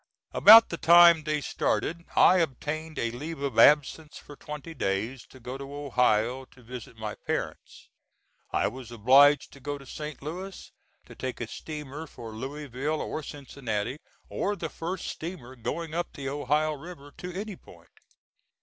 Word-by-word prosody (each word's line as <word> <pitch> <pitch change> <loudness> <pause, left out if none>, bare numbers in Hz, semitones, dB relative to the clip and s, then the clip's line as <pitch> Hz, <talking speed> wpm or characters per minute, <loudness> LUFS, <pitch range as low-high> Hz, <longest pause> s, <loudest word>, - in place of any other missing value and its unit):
About 225 +2 +9
the 170 - -4
time 170 -1 +7
they 150 -1 0
started 170 +3 -1
I 185 - +6
obtained 155 0 -2
a 115 - -1
leave 150 +6 -6
of 140 -1 -1
absence 150 +1 +4
for 145 - -12
twenty 150 +3 -8
days 110 +1 -2
to 130 - -16
go 125 +2 -7
to 140 +1 -8
Ohio 125 -3 +1
to 130 -1 -20
visit 120 -1 -9
my 110 -1 -4
parents. - - -5 0.6
I - - +1
was 125 +1 -8
obliged 135 +6 +5
to 140 - -14
go 145 +2 -4
to 140 - -14
St. 150 +1 -7
Louis 185 +5 -7 0.3
to - - -13
take 130 -2 -5
a 120 - -2
steamer 150 +4 -7
for 115 -5 -10
Louisville 140 +4 -4
or 155 - -4
Cincinnati, 130 -4 -5 0.3
or 205 - -2
the 190 - -5
first 175 +3 -5
steamer 155 -7 -7
going 160 +7 -4
up 175 +1 -3
the 135 -1 -5
Ohio 145 +2 0
River 145 -2 -11
to 180 - -6
any 210 -1 -5
point. 85 - -18
145 Hz, 160 wpm, -27 LUFS, 125-160 Hz, 0.6 s, About